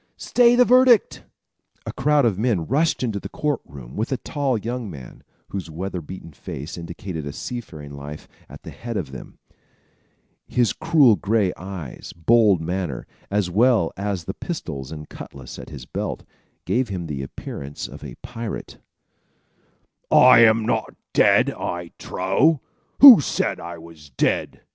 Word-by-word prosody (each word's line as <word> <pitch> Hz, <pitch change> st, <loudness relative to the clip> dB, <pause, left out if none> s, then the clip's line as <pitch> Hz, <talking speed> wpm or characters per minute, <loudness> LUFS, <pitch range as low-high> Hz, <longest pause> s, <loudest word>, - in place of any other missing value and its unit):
stay 245 Hz, -1 st, +4 dB
your 250 Hz, 0 st, +6 dB
verdict!" 250 Hz, -3 st, +5 dB, 0.6 s
A -, -, -5 dB
crowd 145 Hz, -1 st, +2 dB
of 105 Hz, -5 st, +1 dB
men 105 Hz, -8 st, +1 dB
rushed 150 Hz, -, +1 dB
into 110 Hz, -5 st, -1 dB
the 100 Hz, -, -8 dB
court 150 Hz, +2 st, -2 dB
room 65 Hz, -3 st, -11 dB
with 110 Hz, +5 st, -2 dB
a 130 Hz, -, +1 dB
tall 135 Hz, -1 st, -1 dB
young 115 Hz, +1 st, -4 dB
man, 70 Hz, -8 st, -11 dB, 0.3 s
whose 95 Hz, -4 st, -5 dB
weather 90 Hz, +3 st, -5 dB
beaten 85 Hz, 0 st, -10 dB
face 70 Hz, +2 st, -7 dB
indicated 85 Hz, -1 st, -6 dB
a -, -, -4 dB
seafaring 80 Hz, -, -7 dB
life, 70 Hz, +2 st, -9 dB, 0.2 s
at -, -, -12 dB
the -, -, -9 dB
head 115 Hz, -2 st, -6 dB
of 75 Hz, -9 st, -4 dB
them. 65 Hz, -, -10 dB, 1.1 s
His 120 Hz, -3 st, +1 dB
cruel 155 Hz, -8 st, +4 dB
gray 100 Hz, -3 st, +1 dB
eyes, 90 Hz, -7 st, -8 dB
bold 105 Hz, +1 st, +4 dB
manner, 85 Hz, -5 st, -3 dB, 0.2 s
as 100 Hz, -3 st, 0 dB
well 110 Hz, -3 st, +3 dB
as 100 Hz, -2 st, -3 dB
the 95 Hz, -, -5 dB
pistols 80 Hz, -, -6 dB
and 75 Hz, -1 st, -8 dB
cutlass 65 Hz, -3 st, -10 dB
at -, -, -9 dB
his 65 Hz, -4 st, -9 dB
belt, -, -, -4 dB, 0.4 s
gave 125 Hz, -1 st, 0 dB
him 90 Hz, -3 st, -4 dB
the 75 Hz, -4 st, -4 dB
appearance 70 Hz, +1 st, -7 dB
of 70 Hz, +5 st, -12 dB
a 65 Hz, -5 st, -8 dB
pirate. 115 Hz, -2 st, -7 dB, 1.3 s
"I 125 Hz, -2 st, +7 dB
am 110 Hz, -1 st, +5 dB
not -, -, -1 dB, 0.2 s
dead, -, -, +4 dB
I 85 Hz, -1 st, -5 dB
trow! 130 Hz, -, +1 dB, 0.4 s
Who 260 Hz, -, +12 dB
said -, -, -1 dB
I 85 Hz, +1 st, -7 dB
was 80 Hz, -2 st, -14 dB
dead?" 60 Hz, -, -1 dB
95 Hz, 155 wpm, -22 LUFS, 80-120 Hz, 1.3 s, Who